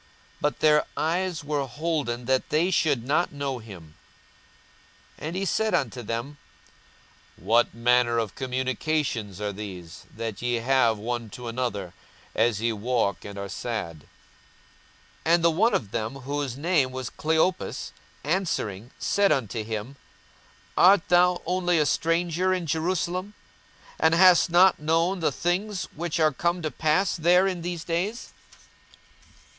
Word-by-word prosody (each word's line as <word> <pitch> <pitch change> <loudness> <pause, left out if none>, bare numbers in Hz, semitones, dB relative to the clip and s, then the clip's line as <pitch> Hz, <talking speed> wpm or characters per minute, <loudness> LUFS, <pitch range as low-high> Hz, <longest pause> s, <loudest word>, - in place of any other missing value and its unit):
42:024:016 - - -31 0.3
But 150 - 0
their 150 -1 +4
eyes 175 0 -1
were 145 -2 -2
holden 145 -5 -2
that 130 +1 0
they 165 +5 +2
should 145 -9 +1
not 150 +6 +1
know 140 -3 -3
him. 90 -9 -12 1.3
42:024:017 - - -5
And 165 - -5
he 195 +1 -1
said 220 +2 +1
unto 125 -2 -2
them, 120 +6 -4 1.0
What 115 +8 +2
manner 120 0 +3
of 110 -4 -1
communications 130 - -2
are 105 -1 -3
these 95 -5 -9
that 115 -2 -5
ye 120 0 0
have 120 -1 +2
one 115 +1 -4
to 120 +4 -8
another, 115 -7 -3 0.4
as 110 -2 +2
ye 115 0 +1
walk, 110 -3 -1
and 100 -1 -8
are 100 0 -4
sad? 100 -5 -4
42:024:018 75 - -20 1.2
And 165 +1 +4
the 170 - +5
one 215 +9 +2
of 100 - -2
them, 115 +3 -3
whose 135 -1 -4
name 150 -4 +1
was 130 -1 -5
Cleopas, 160 +4 -1 0.3
answering 130 - -2
said 200 -1 +2
unto 115 -6 -1
him, 110 +5 -5 0.8
Art 185 0 +5
thou 180 +1 +4
only 180 0 +1
a 150 - +3
stranger 170 +4 +1
in 180 -2 -3
Jerusalem, 180 +4 -2 0.6
and 160 +1 +4
hast 180 0 +6
not 180 +2 +5
known 165 +5 +1
the 165 - +1
things 190 +3 -1
which 170 +1 -3
are 155 -1 +4
come 170 +4 -1
to 155 - -2
pass 155 +8 +1
there 180 +3 +4
in 185 -3 -2
these 175 -1 -4
days? 185 +9 -3
145 Hz, 145 wpm, -26 LUFS, 115-175 Hz, 1.3 s, hast